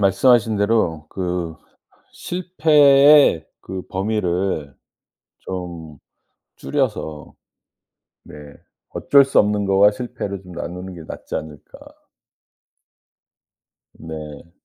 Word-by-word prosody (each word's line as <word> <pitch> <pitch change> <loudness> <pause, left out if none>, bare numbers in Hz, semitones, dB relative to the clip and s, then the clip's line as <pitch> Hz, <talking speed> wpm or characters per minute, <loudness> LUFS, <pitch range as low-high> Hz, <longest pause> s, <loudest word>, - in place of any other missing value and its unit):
말씀하신 110 +3 +3
대로 100 -7 0
그 90 -3 -4 0.6
실패의 150 - +4
그 95 -1 -7
범위를 95 -7 -2 0.7
좀 85 -5 -8 0.6
줄여서 105 - -3 0.9
네. - - -13 0.6
어쩔 140 -1 +4
수 135 - +1
없는 105 0 +2
거와 100 +1 +5
실패를 100 -5 -6
좀 90 - -13
나누는 90 +2 -7
게 85 - -10
낫지 - - -8
않을까. 75 -2 -8 2.2
네. 80 0 -10
95 Hz, 165 characters per minute, -20 LUFS, 85-115 Hz, 2.2 s, 거와